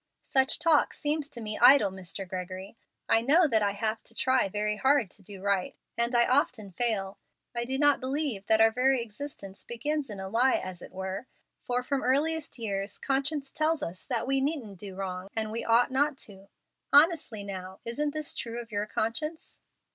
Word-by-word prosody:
"Such 265 0 +3
talk 325 -3 +3
seems 295 0 -2
to 235 - -7
me 215 -1 -4
idle, 245 -5 +7
Mr. 190 +1 -5
Gregory. 185 +2 -6 0.3
I 225 - +5
know 305 +9 +5
that 225 -6 +2
I 200 -1 +1
have 215 +2 -2
to 230 - -4
try 260 -5 +2
very 210 +1 -1
hard 265 -5 +2
to - - -10
do 195 0 -9
right, 200 -2 0 0.2
and 235 +1 0
I 235 0 +5
often 250 -7 +1
fail. 195 -1 -1 0.3
I 235 0 -1
do 265 +2 -2
not 290 0 +4
believe 260 -6 -2
that 220 0 +5
our 225 0 +6
very 260 +2 +2
existence 210 -4 -8
begins 290 +4 -3
in 205 -2 -7
a 190 - -5
lie, 240 +6 +3
as 185 -1 -5
it - - -11
were, 190 +5 -5 0.3
for 250 0 -1
from 275 +1 -1
earliest 300 +4 0
years 200 -3 -3
conscience 275 +1 -1
tells 310 0 0
us 180 +2 -6
that - - -1
we 270 +1 +1
needn't 265 - -3
do 195 -1 -8
wrong 185 -1 -5
and 220 0 -2
ought 235 +2 +4
not 285 +2 +1
to. 195 -1 -15 0.4
Honestly 290 - +4
now, 190 -1 -7
isn't 290 +6 -1
this 305 -1 -2
true 235 0 -5
of 235 -1 -9
your 205 0 -2
conscience?" 305 +11 -3
235 Hz, 190 wpm, -28 LUFS, 200-275 Hz, 0.4 s, idle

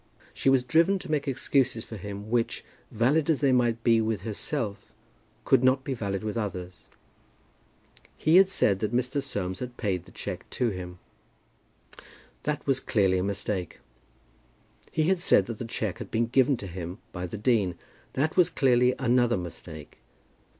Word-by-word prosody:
She - - +1
was 135 -2 +4
driven 165 +9 +3
to 175 - -8
make 150 -1 0
excuses 130 -3 0
for 110 - -8
him 100 +1 -7
which, 120 -1 0 0.2
valid 140 +8 +2
as 155 - +3
they 140 -2 +3
might 120 -2 +2
be 115 -2 +4
with 110 -4 -1
herself, 110 0 -4 0.5
could 120 - +4
not 130 +1 +3
be 135 - -2
valid 100 -4 -3
with 110 +2 -2
others. 90 -4 -6 1.3
He 160 +3 +4
had 190 0 +7
said 100 - +2
that 110 +3 -1
Mr. 125 +3 0
Soames 95 -8 -3
had 125 -1 -6
paid 95 -5 -2
the - - -16
cheque - - -6
to 125 - +2
him. 90 -3 -6 1.4
That 150 -1 -3
was 135 -2 +2
clearly 95 -8 +2
a - - -1
mistake. 100 -2 -3 1.1
He 155 - +1
had 185 +3 +2
said 175 - +4
that 115 -2 -6
the 120 - -4
cheque 110 -4 -3
had - - -7
been 115 +1 +1
given 130 +2 +3
to 100 - -7
him 90 0 -6
by 90 -1 -5
the 100 - -6
dean. 105 -5 +1 0.4
That 155 +4 0
was 180 -2 +5
clearly 125 -4 +3
another 120 -3 +2
mistake. 80 -3 -9
115 Hz, 170 wpm, -27 LUFS, 100-135 Hz, 1.4 s, had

